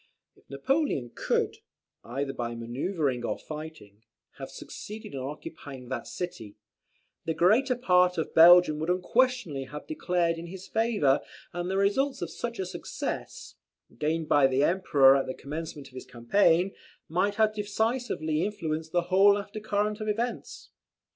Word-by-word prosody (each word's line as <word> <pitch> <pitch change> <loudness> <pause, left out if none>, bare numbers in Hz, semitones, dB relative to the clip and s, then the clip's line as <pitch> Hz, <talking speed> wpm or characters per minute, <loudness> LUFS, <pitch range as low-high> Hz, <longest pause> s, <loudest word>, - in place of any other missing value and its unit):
If - - -27
Napoleon 140 - -1
could, - - -1 0.5
either 135 +3 -3
by 120 -2 -4
manoeuvring 130 +3 -2
or 110 - -2
fighting, 155 -10 -9 0.4
have - - -6
succeeded 215 -6 -9
in 135 - -4
occupying 135 -1 -8
that 130 - -4
city, 115 - -6 0.7
the 160 - -1
greater 250 +9 +3
part 180 -6 +3
of 160 - -3
Belgium 170 -2 +7
would 160 +2 -3
unquestionably 185 - +1
have 150 +3 -9
declared 175 - -1
in 170 - -7
his 190 +2 -9
favour; 215 - +2 0.3
and 175 +1 -3
the 190 - -1
results 265 +8 +1
of - - -5
such 235 -1 -5
a 190 - -2
success, - - -6 0.4
gained 155 +1 -1
by 145 -2 +5
the 135 +1 +1
Emperor 145 -7 +5
at 135 - 0
the 130 - -4
commencement 150 -1 -7
of - - -25
the 130 - -8
campaign, 170 +9 +2 0.3
might 185 +5 0
have 215 0 +3
decisively 210 -6 -1
influenced 160 -6 -3
the 175 - +3
whole 200 +2 +6
after 205 +1 -6
current 210 0 -1
of 215 - -4
events. 230 +3 -4
175 Hz, 150 wpm, -28 LUFS, 140-205 Hz, 0.7 s, Belgium